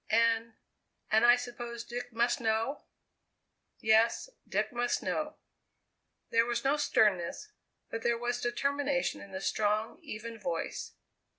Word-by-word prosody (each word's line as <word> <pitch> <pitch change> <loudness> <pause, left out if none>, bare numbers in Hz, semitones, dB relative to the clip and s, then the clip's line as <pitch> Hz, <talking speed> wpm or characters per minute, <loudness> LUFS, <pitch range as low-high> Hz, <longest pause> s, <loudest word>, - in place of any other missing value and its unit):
"And 230 0 +3 0.6
and 220 +1 +5
I 240 0 +8
suppose 240 -1 -6
Dick 245 +1 -6
must 240 +3 +1
know?" 225 +5 0 0.9
"Yes. 225 - +3 0.2
Dick - - 0
must 240 0 0
know." 305 0 -2 1.0
There 230 0 +4
was 235 0 -1
no 275 +2 +3
sternness, 215 - +1 0.4
but 225 - -3
there 235 0 +2
was 240 +1 -2
determination 280 +2 0
in 200 - -11
the 190 0 -5
strong, 215 +2 0
even 225 +1 -7
voice. 170 -5 -3
235 Hz, 125 wpm, -31 LUFS, 220-245 Hz, 1.0 s, I